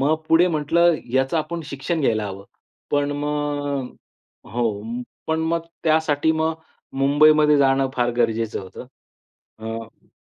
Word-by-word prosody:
मग 145 +3 +3
पुढे 170 +2 +5
म्हटलं 170 +2 +3 0.2
याचं 135 +4 +1
आपण 165 +2 -3
शिक्षण 145 +4 -3
घ्यायला 110 -6 +1
हवं. 100 0 -8 0.5
पण 145 0 +1
मग 145 -2 -2 0.6
हो, 115 -4 -1 0.4
पण 160 0 0
मग 165 0 -1 0.2
त्यासाठी 160 -1 +2
मग 160 0 0 0.4
मुंबईमध्ये 150 +2 +5
जाणं 135 -1 +3
फार 120 0 +2
गरजेचं 115 -2 0
होतं. 95 +6 -10 0.7
अ 115 0 -8
145 Hz, 125 wpm, -22 LUFS, 125-160 Hz, 0.7 s, पुढे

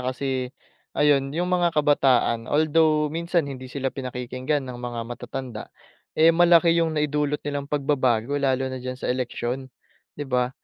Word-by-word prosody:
kasi, 130 -1 -3 0.5
ayun, 140 -2 +3
yung 175 +4 -1
mga 175 -1 +3
kabataan 130 -6 +2
although 155 0 +3
minsan 170 -1 0
hindi 130 -2 -7
sila 135 0 -3
pinakikinggan 130 +2 -3
ng 125 - -6
mga 120 -1 -4
matatanda, 120 -1 -7 0.5
eh, 165 +1 +6
malaki 170 -1 +5
yung 165 -1 +1
naidulot 150 -1 0
nilang 145 -1 -3
pagbabago 135 -3 +1
lalo 135 -1 +1
na 130 - -5
diyan 130 0 -5
sa - - -5
eleksyon, 125 +1 -3 0.5
'di 145 - -3
ba? 125 -1 +1
140 Hz, 145 wpm, -24 LUFS, 125-150 Hz, 0.5 s, eh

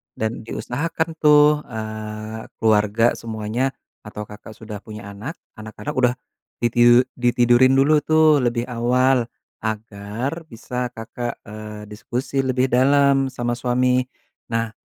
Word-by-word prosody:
dan 110 0 -4
diusahakan 160 +10 -2
tuh, 150 0 +6
eee, 110 -1 -6
keluarga 110 +1 +3
semuanya 115 +4 -2 0.3
atau 105 0 -8
Kakak 105 +1 -12
sudah 105 -2 -8
punya 105 -2 -9
anak, 120 - -7 0.2
anak 110 0 -9
Kakak 150 - -5
udah 125 -1 +3 0.5
ditiu 120 +1 +5 0.2
ditidurin 120 +1 +4
dulu 150 +3 +4
tuh 155 -1 +4
lebih 120 -2 0
awal 125 +1 +2 0.3
agar 110 +8 -4
bisa 125 0 -4
Kakak, 115 +1 -5
eee, 105 0 -9
diskusi 125 +4 -3
lebih 130 -1 +1
dalam 135 +1 +4
sama 120 -2 -3
suami. 125 +1 +1 0.4
Nah, 115 -1 -1
120 Hz, 120 wpm, -22 LUFS, 110-130 Hz, 0.5 s, tuh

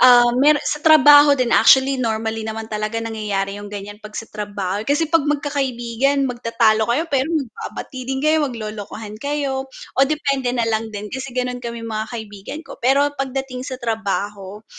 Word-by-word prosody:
um, 240 -1 +7
meron 295 +1 +5
sa 300 - -2
trabaho 290 -2 +7
'din 250 -2 0
actually 265 0 +5
normally 225 -1 -1
naman 220 0 -4
talaga 215 +1 -2
nangyayari 205 -3 -3
'yong 205 - -8
ganyan 205 +1 -8
'pag 215 -1 -10
sa - - -4
trabaho 205 -2 -3
kasi 295 +3 +2
'pag 330 -4 +4
magkakaibigan 275 -2 0
magtatalo 230 -3 +1
kayo 270 +8 +1
pero 275 +1 +2
magbabati 260 -3 -5
'din 265 0 -1
kayo 310 0 +3
maglolokohan 215 -2 -7
kayo 275 -2 -2
oh, 270 +1 -1
depende 280 -4 -1
na 235 - +1
lang 225 0 -1
'din 210 -1 -7
kasi 265 0 -5
gano'n 250 0 -2
kami 235 -1 -6
mga 220 -1 -3
kaibigan 215 +4 -7
ko - - -12
pero 280 +4 +3
pagdating 270 -2 -4
sa 260 - -5
trabaho, 210 -3 -4
240 Hz, 165 wpm, -20 LUFS, 215-275 Hz, -, um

